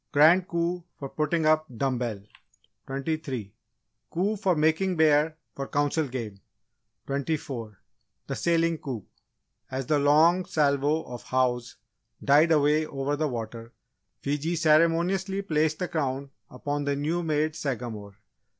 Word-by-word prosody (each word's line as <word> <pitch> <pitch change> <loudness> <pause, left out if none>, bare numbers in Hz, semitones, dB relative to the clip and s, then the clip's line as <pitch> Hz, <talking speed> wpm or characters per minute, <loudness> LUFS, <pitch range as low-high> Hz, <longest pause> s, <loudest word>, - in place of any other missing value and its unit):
Grand 165 +5 +5
Coup 170 +1 -1
for 140 - -6
Putting 155 +2 0
Up 155 0 +3
Dumb 130 -2 0
bell 110 -5 -3 0.6
23. 135 -6 -3 0.6
Coup 195 +6 0
for 195 -4 +1
Making 160 +5 +2
Bear 155 0 +3 0.2
for 135 0 -5
Council 145 +1 0
Game 115 -6 -6 0.7
24. 135 -6 -3 0.5
The 135 - -4
Sailing 165 0 +1
Coup. 125 -8 -5 0.6
As 130 0 -3
the 150 +2 +2
long 160 +6 +4
salvo 145 +1 +1
of 120 -1 -8
"Hows!" 125 -2 0 0.5
died 150 +4 +5
away 150 0 +3
over 140 0 -2
the 155 +1 0
water, 115 -2 -6 0.5
Fiji 150 +4 -1
ceremoniously 170 +5 +2
placed 155 -3 +1
the 180 - -2
Crown 140 -4 -2 0.2
upon 145 +3 -3
the 140 0 0
new 155 +5 -1
made 155 -1 0
Sagamore. 115 -8 -4
150 Hz, 130 wpm, -27 LUFS, 135-160 Hz, 0.7 s, Grand